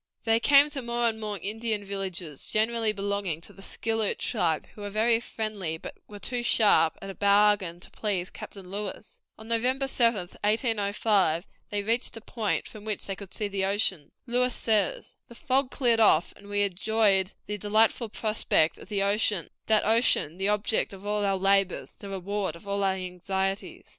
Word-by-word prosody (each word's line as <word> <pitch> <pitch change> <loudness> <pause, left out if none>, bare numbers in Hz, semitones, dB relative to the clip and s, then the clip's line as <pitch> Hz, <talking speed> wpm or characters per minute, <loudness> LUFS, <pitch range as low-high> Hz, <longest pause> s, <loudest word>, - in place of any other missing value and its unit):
They 225 0 +3
came 285 +4 +5
to 280 -2 -3
more 235 0 0
and 220 -1 -1
more 210 -1 -3
Indian 220 0 -2
villages, 190 -6 -4
generally 225 0 +2
belonging 200 -5 -2
to 205 - -10
the 195 - -15
Skilloot 225 +1 -1
tribe, 170 -9 0
who 210 - -12
were 205 - -4
very 225 +3 +2
friendly, 215 -8 -3
but - - -8
who - - -21
were 205 - -8
too 245 +3 -3
sharp 200 -9 +4
at 195 - -5
a - - -9
bargain 200 -3 +3
to - - -10
please 190 -4 -1
Captain 190 -3 -10
Lewis. 205 +1 -6 0.2
On 220 - -12
November 250 +4 +1
7, 235 -4 +3 0.3
1805, 205 - +1 0.2
they 205 -2 -2
reached 230 +2 -1
a - - -9
point 220 -2 -2
from 215 -2 -11
which 215 -2 -4
they 195 - -4
could 195 -1 -11
see 210 +3 -1
the 195 -1 -2
ocean. 195 -6 0
Lewis 250 0 +1
says: 215 -4 0
"The 235 - -13
fog 260 +2 +1
cleared 240 -5 +2
off, 175 -7 +4
and 200 - -16
we 205 0 +1
enjoyed 200 0 +2
the 210 0 -4
delightful 220 +3 +2
prospect 210 -7 +1
of - - -13
the 200 -2 0
ocean 200 -3 +1 0.2
that 215 -1 +3
ocean, 215 -7 +3
the 195 - +1
object 210 0 +1
of 195 +1 -11
all 210 0 0
our 195 -1 +1
labors, 195 0 +1
the 200 - -10
reward 195 +1 -3
of 185 +4 -14
all 200 0 -1
our 190 -1 +2
anxieties. 190 +1 -4
205 Hz, 185 wpm, -27 LUFS, 195-225 Hz, 0.3 s, came